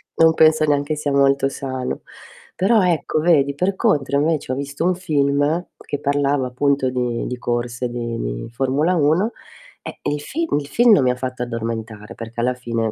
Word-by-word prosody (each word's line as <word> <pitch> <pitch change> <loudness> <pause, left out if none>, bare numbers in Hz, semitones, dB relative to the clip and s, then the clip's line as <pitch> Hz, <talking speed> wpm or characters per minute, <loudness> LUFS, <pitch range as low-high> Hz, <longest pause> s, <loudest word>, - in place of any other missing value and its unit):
Non 160 0 +5
penso 155 0 +5
neanche 145 +1 0
sia 145 -1 -2
molto 140 0 +3
sano. 130 -2 -4 0.5
Però 205 +3 +3
ecco, 170 -3 +1
vedi, 145 -4 +3
per 185 +6 0
contro 150 - +1
invece 150 -3 0
ho - - 0
visto 140 +4 -3
un 185 - +3
film 150 -1 0
che 145 - -5
parlava 145 -1 +1
appunto 135 +1 0
di 125 -2 -2
di 125 - -4
corse 120 0 -2
di 120 -1 -4
di - - -4
Formula 135 +8 +1
1, 170 +8 +2 0.5
e - - -8
il 145 0 -2
film 325 - -1
il 140 - -7
film 235 +9 +4
non 195 - +6
mi 125 - +3
ha 125 - +1
fatto 125 -1 -5
addormentare, 115 -2 -5
perché 115 +1 -6
alla 125 +1 +1
fine 115 -3 -2
140 Hz, 180 wpm, -20 LUFS, 125-155 Hz, 0.5 s, non